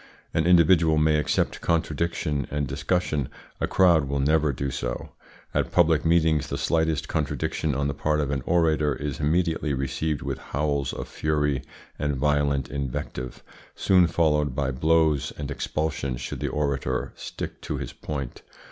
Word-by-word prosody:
An 80 +1 +1
individual 85 -2 +5
may 75 0 +4
accept 75 - 0
contradiction 80 -3 -1
and 75 0 -1
discussion; 75 -2 -1 0.3
a - - 0
crowd 85 -6 +4
will 70 - 0
never 75 +1 +3
do 70 +1 -3
so. - - -4 0.4
At - - 0
public 80 -3 +4
meetings 80 -3 +3
the 70 - -3
slightest 80 0 0
contradiction 75 -1 -1
on 70 +1 0
the 70 - -1
part 75 0 0
of 70 -2 -1
an 70 -2 -1
orator 80 -3 +2
is 70 0 -4
immediately 80 -1 +1
received 70 +3 -2
with - - -3
howls 70 -2 -1
of - - -6
fury 75 -2 0 0.4
and 75 -1 0
violent 70 0 +1
invective, 65 -2 -5 0.3
soon 90 -2 +4
followed 75 -4 +1
by 70 -2 0
blows, 80 +1 +2
and 70 -1 -4
expulsion 75 -3 -2
should - - -5
the - - -1
orator 70 -4 -1
stick - - -7
to - - -3
his - - -5
point. 70 -5 -5
75 Hz, 155 wpm, -25 LUFS, 70-80 Hz, 0.4 s, individual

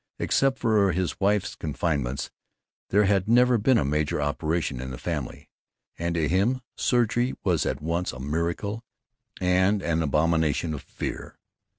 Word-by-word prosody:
Except 135 -1 +1
for 105 -6 +2
his 90 -1 -2
wife's 100 0 +1
confinements 70 -4 -2 0.6
there 105 +2 +4
had 95 -1 +2
never 125 0 +5
been 125 +4 +4
a - - +1
major 75 +1 0
operation 75 -2 -1
in 65 - -5
the 65 - -6
family, - - -5 0.5
and 85 0 -2
to 80 -2 +1
him 100 - +1
surgery 120 +1 +1
was 90 -6 +1
at 65 +2 -2
once 85 +3 -1
a 65 - -10
miracle 85 - -2 0.6
and 95 +2 +2
an 80 -1 0
abomination 80 +1 +1
of 75 - -5
fear. - - -6
85 Hz, 150 wpm, -26 LUFS, 75-105 Hz, 0.6 s, never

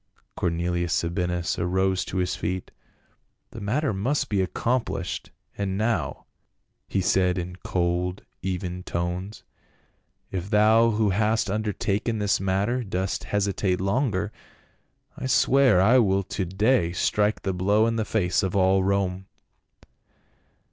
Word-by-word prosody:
Cornelius 85 0 -1
Sabinus 90 0 -1
arose 95 +1 +1
to 95 - -5
his 90 0 0
feet. 90 +2 -4 0.8
"The 115 - -9
matter 125 +6 0
must 135 +8 -1
be 100 -2 +1
accomplished, 115 +6 -2 0.3
and 95 -1 -2
now," 110 +2 -1 0.6
he 95 - 0
said 90 0 +2
in 90 0 -5
cold 90 +1 -1 0.2
even 90 -1 -3
tones. 90 +4 -4 0.4
" - - -44
If 95 0 -4
thou 110 +2 +5
who 105 -2 +1
hast 110 +1 +1
undertaken 105 +1 -1
this 105 -1 +1
matter 100 +6 0
do.st 95 -2 -3
hesitate 100 -2 0
longer, 105 0 0 0.8
I 130 - -4
swear 130 -3 +4
that 95 - +4
I 125 +4 +6
will 100 -3 +2
to 95 0 -3
day 95 -1 +1
strike 105 +4 +1
the 95 - -1
blow 100 +4 +2
in 115 0 0
the 110 - +1
face 100 -4 +1
of 95 -2 -2
all 95 0 +3
Rome." 95 -1 0
95 Hz, 135 wpm, -25 LUFS, 90-110 Hz, 0.8 s, I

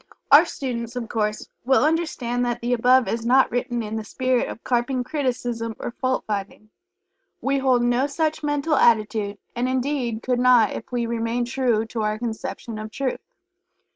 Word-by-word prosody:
Our - - +9
students, 240 -3 -5
of 240 -2 -4
course, 210 -1 -2 0.2
will 265 +2 +3
understand 300 -7 0
that 240 -1 -1
the 240 +1 0
above 250 +1 +4
is 230 0 -2
not 255 +3 +4
written 245 -1 -1
in 215 +1 -4
the 220 - -4
spirit 255 +3 0
of - - -9
carping 250 +1 0
criticism 245 -5 -2
or - - -5
fault 255 +1 -1
finding. 210 +1 -5 0.7
We 275 0 0
hold 255 -2 +3
no 245 +3 +2
such 310 +2 -1
mental 290 +1 0
attitude, 215 -5 +2 0.2
and 245 +1 0
indeed 255 -3 -1
could 250 -1 0
not 250 -3 +5
if - - -7
we 240 -1 -1
remain 230 +1 -1
true 240 -3 0
to 225 0 -4
our 215 0 0
conception 225 0 -5
of 215 0 -6
Truth. 260 +3 -3
245 Hz, 170 wpm, -23 LUFS, 230-260 Hz, 0.7 s, Our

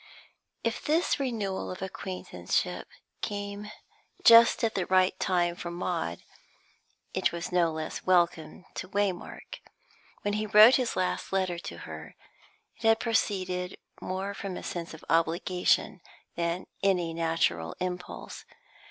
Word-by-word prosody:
If 230 -1 -1
this 315 +1 +2
renewal 220 -8 -2
of 185 +1 -6
acquaintanceship 190 0 -3 0.3
came 205 0 -4 0.5
just 230 +2 +8
at 225 -1 +2
the 185 - -1
right 185 0 +4
time 175 -2 +1
for 175 - -6
Maud, 170 - -3 0.9
it - - +1
was 170 +1 -5
no 175 -2 +3
less 155 0 -5
welcome 175 -2 +1
to 185 - -6
Waymark. 200 -2 -3 0.6
When 205 - 0
he 215 +1 -1
wrote 215 +4 +8
his 250 -3 -1
last 185 -1 -1
letter 185 -3 0
to - - -7
her, - - -9 0.6
it - - -20
had 225 -1 +4
proceeded 185 -6 -1 0.2
more 190 +2 -3
from 195 -2 -5
a - - -7
sense 170 -2 -5
of 160 - -14
obligation 175 +2 +1 0.3
than 170 +1 -1 0.2
any 180 -4 +2
natural 165 - 0
impulse. 180 -1 -5
185 Hz, 130 wpm, -29 LUFS, 175-205 Hz, 0.9 s, just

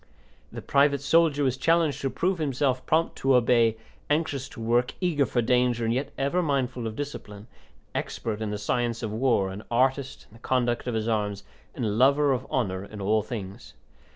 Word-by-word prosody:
The - - -8
private 140 0 +3
soldier 155 -1 +3
was 130 -2 +1
challenged 165 -1 +2
to 135 - 0
prove 180 +5 -1
himself 135 -3 0
prompt 165 +1 +1
to 135 -1 +3
obey, 115 -2 +3 0.3
anxious 145 -3 -1
to - - -12
work, 120 +2 +1
eager 160 -7 +1
for 120 - 0
danger, 125 -1 +2
and 115 - +1
yet 130 +4 -2
ever 140 +7 +1
mindful 130 -6 -1
of 110 - -6
discipline, 105 -8 -7
an - - -27 0.5
expert 110 -1 -5
in 110 - -2
the 105 - -3
science 120 +2 -1
of 110 - -3
war, 110 -5 +1
an 100 +3 -8
artist 135 +2 0
in - - -20
the 115 - -15
conduct 125 -2 0
of 120 - -1
his 110 0 -1
arms, 105 -3 -1 0.3
and 125 - -2
a - - 0
lover 140 +6 +3
of 130 +1 -4
honour 95 -7 -1
in 105 +1 -10
all 105 +2 +2
things. 100 -3 -8
125 Hz, 195 wpm, -26 LUFS, 110-140 Hz, 0.5 s, private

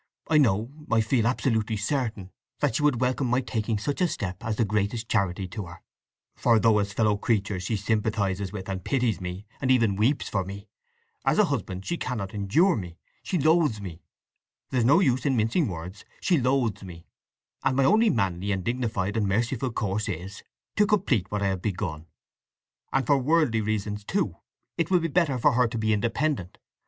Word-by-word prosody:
I 155 -1 +5
know—I 115 +2 +1
feel 115 +1 +1
absolutely 110 -4 0
certain—that 110 -5 -3
she 150 - 0
would 145 -5 +2
welcome 130 +1 +1
my 125 +1 +2
taking 115 -3 -2
such 145 - -3
a 180 - +4
step 95 - -5
as 110 -1 -1
the 115 - +1
greatest 105 +3 -1
charity 95 -2 0
to 95 0 -6
her. 85 - -12 0.5
For 115 -2 +3
though 110 -1 +4
as 100 0 -1
a - - -13
fellow 105 -2 +2
creature 100 -3 0
she 95 +5 -2
sympathizes 100 -2 -1
with, 95 -2 -7
and 95 -2 -4
pities 125 -8 0
me, 90 +2 -6 0.2
and 130 - 0
even 115 -6 +3
weeps 120 +8 +1
for 95 -3 -1
me, 100 +2 -8 0.6
as - - +2
a - - +6
husband 95 +1 -3
she 170 - -2
cannot 110 -10 -4
endure 110 - +3
me—she 90 - -6
loathes 155 -6 +3
me—there's 95 - -7
no 145 +9 +5
use 130 -7 +2
in 135 -3 +2
mincing 115 +9 +2
words—she 95 - -3
loathes 125 -3 +1
me, 85 -3 -10 0.6
and 130 -1 +1
my 135 - +4
only 220 +9 +5
manly, 100 - 0
and 95 -2 -1
dignified, 115 -4 -1
and 105 -3 +1
merciful 120 +5 0
course 105 0 -2
is 95 +2 -6 0.4
to 210 - +4
complete 145 - +1
what 105 -1 -2
I 100 - +2
have 95 -2 -2
begun… 85 -6 -3 0.8
And 135 -1 +1
for 140 +3 +3
worldly 140 -5 +2
reasons, 105 -1 -2
too, - - -1 0.4
it 165 - +1
will 185 -1 +4
be 165 0 -2
better 155 -5 +2
for 125 - +4
her 125 0 +3
to 115 - -5
be 110 0 +1
independent. 115 - -1
110 Hz, 185 wpm, -26 LUFS, 100-130 Hz, 0.8 s, a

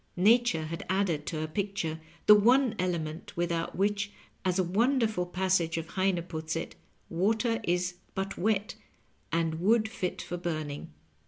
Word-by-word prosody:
Nature 215 -3 +4
had 165 +1 -5
added 185 -6 0
to 160 - -2
her 155 - -1
picture 165 -2 -2 0.3
the 210 - +10
one 240 +4 +5
element 170 -3 -3
without 170 -1 -1
which, 200 +1 0 0.3
as 185 -1 +1
a 185 - +3
wonderful 220 0 +1
passage 180 -2 +1
of 165 0 -4
Heine 185 -2 +1
puts 160 -2 -4
it, 165 - -4 0.3
water 220 +6 +1
is 180 0 0 0.2
but 195 0 -2
wet, 210 +1 0 0.6
and 165 -1 0
wood 220 +4 +3
fit 195 -5 -3
for 175 - -4
burn 155 -4 -3
ing. 145 - -8
180 Hz, 155 wpm, -29 LUFS, 165-205 Hz, 0.6 s, the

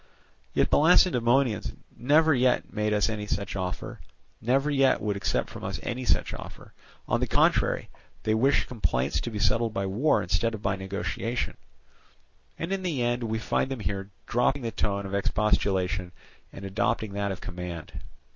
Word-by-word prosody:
Yet - - +2
the - - +5
Lacedaemonians 125 - +4 0.2
never 155 +5 +4
yet 125 -1 +2
made 105 -1 0
us 105 -1 +3
any 105 -2 -3
such 100 -1 -2
offer, 90 -2 -4 0.4
never 135 +5 +2
yet 135 -2 +4
would 105 -1 -1
accept 100 - 0
from - - -10
us - - -3
any 125 +1 -3
such - - +1
offer; - - -10 0.3
on - - +1
the - - 0
contrary, - - +2 0.4
they 110 - +2
wish 130 +5 +3
complaints 80 - -1
to - - -4
be 110 - -5
settled 115 +1 +1
by 95 - 0
war 115 +11 +2
instead 100 +6 0
of 105 - -10
by 100 0 +1
negotiation; 100 +5 -3 1.0
and 165 +4 -3
in 195 - -1
the 160 -9 -1
end 120 +1 0
we 110 0 -1
find 115 - 0
them 135 -4 -4
here 100 -1 -3 0.2
dropping 125 +3 +1
the 115 - -2
tone 100 -2 -1
of 95 - -6
expostulation 95 -3 0 0.4
and 100 - -9
adopting 100 +1 -1
that 100 0 -1
of 95 - -5
command. 85 -3 -7
110 Hz, 170 wpm, -27 LUFS, 100-125 Hz, 1.0 s, the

